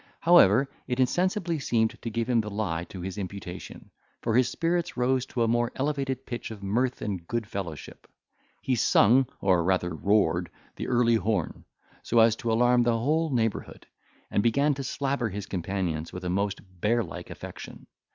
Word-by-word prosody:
However, 135 - +6 0.2
it 125 +1 -2
insensibly 175 +5 +1
seemed 115 -4 +1
to 115 - -4
give 115 +1 -1
the 115 -3 +1
lie 90 -5 -2
to 95 - -9
his 95 +3 -5
imputation; 95 -2 -8 0.3
for 115 -1 0
his 125 0 +4
spirits 170 0 -1
rose 130 +1 +1
to 120 - -1
a - - +2
more 120 +1 +1
elevated 135 -2 -2
pitch 120 - -5
of 105 -3 -9
mirth 120 +6 0
and 95 -5 -4
good 115 -1 -2
fellowship; 95 -6 -7 0.6
he 130 - 0
sung, 125 +2 +4
or 90 -3 +3
rather 90 -1 0
roared, 90 0 +1 0.3
the - - -5
Early 120 -2 +3
Horn, 100 -4 -2 0.4
so 120 - -1
as 115 0 +5
to 115 - -2
alarm 120 +2 +4
the 120 -1 +2
whole 155 +7 +1
neighbourhood, 115 -5 -2 0.5
and - - +2
began 140 +7 +2
to 135 0 -5
slabber 135 -2 -1
his 100 0 -5
companions 90 -3 -3
with 90 - -7
a 90 - -1
most 100 +1 -1 0.2
bear 115 +2 +2
like 85 - -8
affection. - - -9
115 Hz, 170 wpm, -27 LUFS, 100-130 Hz, 0.6 s, However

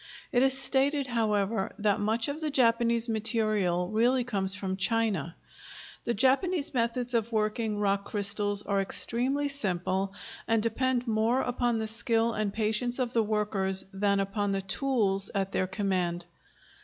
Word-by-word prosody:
It 245 - +2
is 265 0 +4
stated, 275 +1 +2
however, 215 -4 -1
that 205 -1 +1
much 220 +2 0
of 290 +3 -5
the 310 - -2
Japanese 235 -3 +2
material 215 -5 0
really 245 +4 +2
comes 195 -5 +1
from 190 -2 -3
China. 190 -5 -1 0.7
The 235 - -1
Japanese 280 - +1
methods 245 0 -1
of 230 0 0
working 215 0 -1
rock 200 -1 0
crystals 205 0 0
are 200 -1 0
extremely 255 +8 +3
simple 195 -6 -1 0.3
and 225 -1 +1
depend 250 +2 -1
more 225 +3 +1
upon 245 -1 -1
the 220 - -2
skill 225 +1 +1
and 215 -2 -2
patience 220 +3 0
of 250 -2 -2
the 230 - +3
workers 210 -3 0
than 200 0 +1
upon 200 0 -1
the 195 0 -2
tools 195 -3 0
at 195 -1 -1
their 185 - -1
command. 185 -3 -2
220 Hz, 150 wpm, -28 LUFS, 200-240 Hz, 0.7 s, is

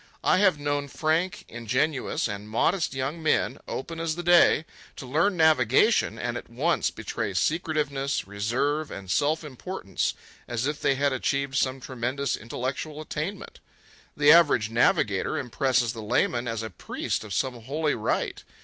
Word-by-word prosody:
I - - +4
have 190 -6 +4
known 145 0 -1
frank, 160 +6 -1
ingenuous, 125 +6 -1
and 105 0 -6
modest 160 - +1
young 135 +5 -3
men, 150 -4 +1
open 165 +5 -5
as 165 -1 -1
the 175 - -5
day, 175 -2 +5 0.3
to - - -8
learn 165 +9 +1
navigation 160 - +4
and 120 0 -3
at - - -9
once 145 +9 +1
betray 110 -2 -4
secretiveness, 145 - 0
reserve, 130 +10 -1
and 95 -2 -7
self 155 +3 +1
importance 145 - -3 0.3
as 120 +1 -2
if 150 +1 -2
they 135 - +2
had 140 0 +1
achieved 140 +1 -1
some 130 0 +1
tremendous 130 +2 -2
intellectual 130 +6 -5
attainment. 155 +5 -5 0.6
The 145 0 +6
average 145 -10 +5
navigator 105 -4 +2
impresses 125 -2 0
the 115 - -7
layman 120 +2 0
as 115 -1 -3
a 110 - -6
priest 90 - -3
of 105 - -10
some 125 +3 -1
holy 150 +6 -1
rite. 110 - -2
135 Hz, 150 wpm, -26 LUFS, 115-155 Hz, 0.6 s, The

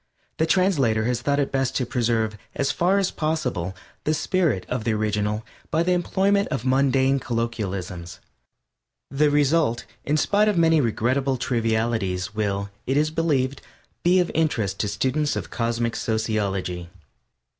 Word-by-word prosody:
The 160 - +1
translator 145 - +2
has 120 0 0
thought 140 +3 +1
it 140 - 0
best 135 -1 0
to 125 - +1
preserve, 115 -3 0 0.2
as 140 - +1
far 185 +3 +2
as 195 -2 +1
possible, 125 - -2 0.3
the 155 - +1
spirit 160 - 0
of 125 -3 -2
the 115 0 +1
original 105 0 -1 0.2
by 160 +2 +2
the 180 - +1
employment 195 +3 +2
of 135 -4 -3
mundane 135 +1 +3
colloquialisms; 100 -8 -4 0.9
the 145 +2 +3
result, 145 -4 +2 0.2
in 150 +2 +1
spite 205 +6 +3
of 210 -4 +2
many 165 -2 +4
regrettable 130 +3 0
trivialities, 110 -6 -1
will, 100 -2 -2 0.2
it 135 +2 +1
is 155 +1 +2
believed, 140 -5 0 0.4
be 180 +2 +4
of 180 - +1
interest 115 - 0
to 105 - 0
students 135 +9 0
of - - -5
Cosmic 115 0 -1
Sociology. 100 -6 -2
125 Hz, 145 wpm, -24 LUFS, 110-155 Hz, 0.9 s, many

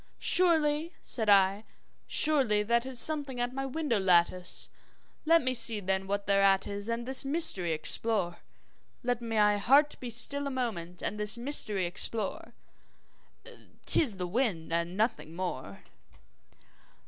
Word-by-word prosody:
`Surely,' 320 -2 +2
said 220 -4 +2
I, 200 +1 +3 0.5
`surely 255 -9 +2
that 235 +3 -1
is 260 -2 0
something 285 -2 +5
at 245 +1 -3
my 270 0 -5
window 275 -5 -3
lattice; 180 -1 0 0.5
Let 330 0 +3
me 255 0 -2
see 230 -3 0
then, 190 0 -3
what 200 0 -4
thereat 195 -1 +1
is, 205 +2 -6
and 230 +1 -4
this 265 +2 +4
mystery 270 - +3
explore 175 +3 -1 0.6
Let 245 -1 -3
my 210 -3 0
heart 285 +7 +2
be 250 - -8
still 280 +5 -2
a - - -3
moment 210 -10 -6
and 210 - -5
this 210 +1 -2
mystery 225 -7 0
explore; 195 +4 0 1.3
'Tis 240 - +2
the 180 - -4
wind 180 -5 -3
and 170 +2 -3
nothing 210 -7 -3
more!' 130 - -7
220 Hz, 135 wpm, -28 LUFS, 190-265 Hz, 1.3 s, something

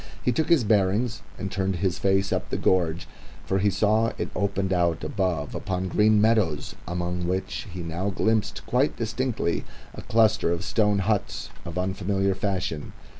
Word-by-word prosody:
He 125 - +2
took 155 +5 0
his 165 -7 +5
bearings 105 +3 +1 0.2
and 95 - -4
turned 95 -1 -1
his 90 0 -1
face 95 0 +2
up - - -2
the - - -1
gorge, 85 -2 +1 0.4
for 95 - +1
he 100 +2 +3
saw 105 +3 +2
it - - -3
opened 100 0 0
out 85 -2 +1
above 90 -7 -1
upon 95 0 -2
green 105 +2 +4
meadows, 105 -9 +2
among 90 0 -2
which 95 +4 -2
he 90 0 -6
now 85 +4 -2
glimpsed 105 0 0
quite 130 +4 +1
distinctly 115 -5 -1 0.3
a - - -8
cluster 110 -5 +3
of 85 0 -1
stone 105 +2 +2
huts 105 -2 -1
of 85 0 -6
unfamiliar 95 +1 0
fashion. 95 -5 -3
95 Hz, 165 wpm, -26 LUFS, 90-110 Hz, 0.4 s, his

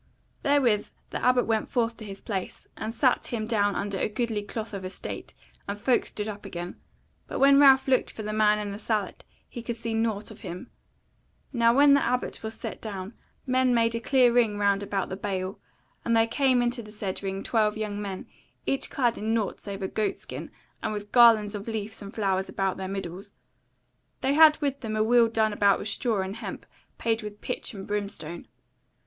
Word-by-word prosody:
Therewith 255 -7 +3 0.2
the - - -4
Abbot 250 -1 +4
went 220 -1 0
forth 230 -2 0
to 220 - -9
his 195 -1 -8
place, 190 -4 -5
and 220 - -4
sat 250 +2 +2
him 225 -3 -3
down 205 -3 +1
under 200 -1 -2
a - - 0
goodly 220 -1 -1
cloth 215 +2 -6
of 195 -1 -5
estate, 185 +1 -7 0.3
and 200 +1 -3
folk 245 +4 +2
stood 210 0 -4
up 205 -1 -6
again; 175 -2 -6 0.5
but - - -4
when 275 +1 +7
Ralph 270 -2 +7
looked 260 -1 +2
for 220 - -7
the 215 0 -3
man 210 -1 +4
in 210 -1 -3
the 200 - -6
sallet 210 -3 -2 0.2
he 240 - -7
could 235 0 -4
see 230 0 -4
nought 225 -2 -1
of - - -12
him. 180 -4 -8 0.8
Now 235 -2 +4
when 280 +3 +6
the 280 - +4
Abbot 250 +1 -1
was 220 0 -5
set - - -7
down, 200 -1 -6 0.3
men 255 -1 +3
made 230 0 +3
a 230 - -1
clear 250 0 +4
ring 225 -4 +3
round 200 -1 +2
about 195 -1 -2
the 190 - -3
bale, 190 -1 -3 0.4
and 230 -1 +2
there 225 - +5
came 255 +1 +2
into 240 0 -1
the 210 -2 -12
said 205 -3 -4
ring 195 0 -3
twelve 215 -2 +1
young 210 -1 -3
men, 195 -2 -5 0.4
each 275 - -1
clad 240 -4 +1
in 220 +2 0
nought 215 -4 -1
save 200 -1 -6
a - - 0
goat 215 +2 -1
skin, - - -8 0.3
and - - -2
with 205 0 -6
garlands 225 -4 +6
of 205 0 -6
leaves 220 -1 -4
and 200 +2 -9
flowers 195 -3 0
about 195 -1 -1
their 190 0 -4
middles: 195 +1 -6 0.9
they 270 +1 +2
had 310 0 +7
with 280 -1 -1
them 215 -2 -4
a 215 - +2
wheel 235 +1 +5
done 220 -1 +1
about 200 -1 +4
with 210 - -4
straw 215 -1 0
and 195 +3 -5
hemp - - -7 0.3
payed 225 0 0
with 210 -1 -8
pitch 250 0 -4
and 195 -1 -7
brimstone. 200 -5 -4
215 Hz, 205 wpm, -27 LUFS, 200-235 Hz, 0.9 s, when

